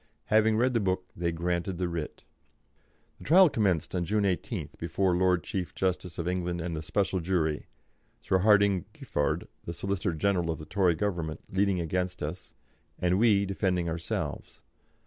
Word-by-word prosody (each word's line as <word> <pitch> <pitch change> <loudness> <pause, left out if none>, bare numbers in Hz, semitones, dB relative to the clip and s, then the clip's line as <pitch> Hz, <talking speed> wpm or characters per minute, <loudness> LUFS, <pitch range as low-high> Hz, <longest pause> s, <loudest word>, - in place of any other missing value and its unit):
Having 110 0 +4
read 125 +2 +2
the 115 - +3
book 95 -2 -1
they 85 0 -1
granted 85 +2 -2
the 90 0 -1
writ. 85 -3 -5 1.0
The - - -11
trial 180 +4 +7
commenced 95 - 0
on 90 -2 0
June 105 +4 +1
18th 95 -3 -2
before 95 -2 +1
the 90 - +1
Lord 90 -3 +3
Chief 90 -3 -4
Justice 90 -2 -1
of 85 - -3
England 90 -1 -1
and 85 0 -3
a 80 - -3
special 95 +4 0
jury, 80 -4 -1 0.6
Sir 95 - +2
Hardinge 100 -2 +4
Giffard, 75 - -2 0.2
the 85 - -4
Solicitor 95 +1 -2
General 90 0 +1
of 80 - -1
the 75 - -9
Tory 90 -2 +2
Government, 85 -5 -2
leading 95 -1 +2
against 90 +1 -2
us, 80 +1 -6 0.4
and 90 +1 +1
we 105 -3 +4
defending 95 -3 0
ourselves. 80 0 -4
90 Hz, 165 wpm, -29 LUFS, 85-100 Hz, 1.0 s, trial